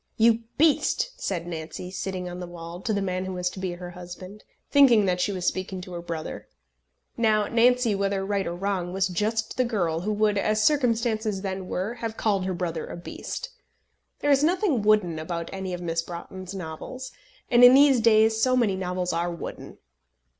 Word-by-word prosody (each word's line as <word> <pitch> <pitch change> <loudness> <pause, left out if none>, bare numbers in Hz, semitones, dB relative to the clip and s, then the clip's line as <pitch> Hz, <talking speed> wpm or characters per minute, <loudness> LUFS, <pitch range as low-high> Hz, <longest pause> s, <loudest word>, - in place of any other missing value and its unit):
"You 230 0 +5 0.2
beast!" 320 - +2
said 175 -4 -2
Nancy, 170 +1 -6
sitting 185 -1 -4
on 180 0 -6
the 180 - -6
wall, 170 0 -8
to 220 - -2
the 200 -2 0
man 185 -1 -2
who 190 - -4
was 180 0 -1
to - - -9
be 185 -2 -2
her 175 0 -8
husband, 180 +3 -10 0.3
thinking 250 -7 +6
that 180 -1 +1
she 205 - +1
was 185 -2 -4
speaking 185 0 -2
to 180 0 -9
her 170 - -5
brother. 165 -2 -6 0.7
Now 215 -2 +3
Nancy, 240 0 +3
whether 195 -1 -1
right 200 -1 -1
or 170 - -3
wrong, 185 -1 -2
was 190 0 +1
just 215 +6 -2
the 255 - +3
girl 180 -9 0
who 200 +5 -2
would, 210 -1 +2
as 215 +1 +1
circumstances 225 -7 +1
then 190 -1 -4
were, 190 +6 -2
have 230 -2 -5
called 200 -4 +1
her 190 - -1
brother 170 -2 -3
a - - -7
beast. - - -6 0.7
There 290 - +2
is 280 +1 +4
nothing 345 - +2
wooden 205 -6 +2
about 170 +1 -4
any 190 -1 -4
of 180 0 -4
Miss 165 -1 -1
Broughton's 180 +2 -8
novels; 185 +9 -7 0.4
and 240 0 +6
in 245 +1 +10
these 275 -2 +6
days 220 0 +4
so 255 +2 +3
many 220 -6 +2
novels 180 -1 -2
are 170 +1 0
wooden! 170 -1 -7
195 Hz, 195 wpm, -26 LUFS, 180-225 Hz, 0.7 s, in